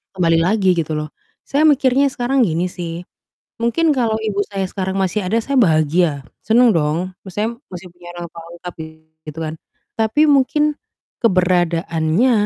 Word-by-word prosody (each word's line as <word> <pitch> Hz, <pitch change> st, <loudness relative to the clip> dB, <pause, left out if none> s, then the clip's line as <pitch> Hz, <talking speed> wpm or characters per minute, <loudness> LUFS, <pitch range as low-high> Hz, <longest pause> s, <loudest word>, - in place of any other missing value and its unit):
kembali 165 Hz, -2 st, +2 dB
lagi 190 Hz, +2 st, +2 dB
gitu 155 Hz, -1 st, -2 dB
loh. 150 Hz, 0 st, -4 dB, 0.3 s
Saya 300 Hz, +3 st, +2 dB
mikirnya 275 Hz, -1 st, +3 dB
sekarang 255 Hz, -1 st, +1 dB
gini 175 Hz, +2 st, -1 dB
sih, 170 Hz, -1 st, -6 dB, 0.6 s
mungkin 270 Hz, +8 st, +1 dB
kalau 235 Hz, -6 st, +1 dB
ibu 210 Hz, -2 st, -2 dB
saya 195 Hz, -1 st, -3 dB
sekarang 190 Hz, -1 st, -3 dB
masih 190 Hz, +1 st, -1 dB
ada 225 Hz, +5 st, +1 dB
saya 275 Hz, +2 st, 0 dB
bahagia, 155 Hz, -, +2 dB, 0.2 s
senang 235 Hz, +2 st, +5 dB
dong, 165 Hz, +1 st, 0 dB, 0.2 s
maksudnya 215 Hz, +5 st, -3 dB
masih 180 Hz, 0 st, -8 dB
punya 175 Hz, 0 st, -17 dB
orang 175 Hz, 0 st, -6 dB
tua 165 Hz, -, -10 dB
lengkap 175 Hz, 0 st, -9 dB, 0.5 s
gitu 155 Hz, +1 st, -8 dB
kan, 155 Hz, 0 st, -4 dB, 0.4 s
tapi 220 Hz, +6 st, +1 dB
mungkin 280 Hz, +2 st, +3 dB, 0.6 s
keberadaannya, 180 Hz, +1 st, +2 dB
185 Hz, 150 wpm, -19 LUFS, 170-235 Hz, 0.6 s, senang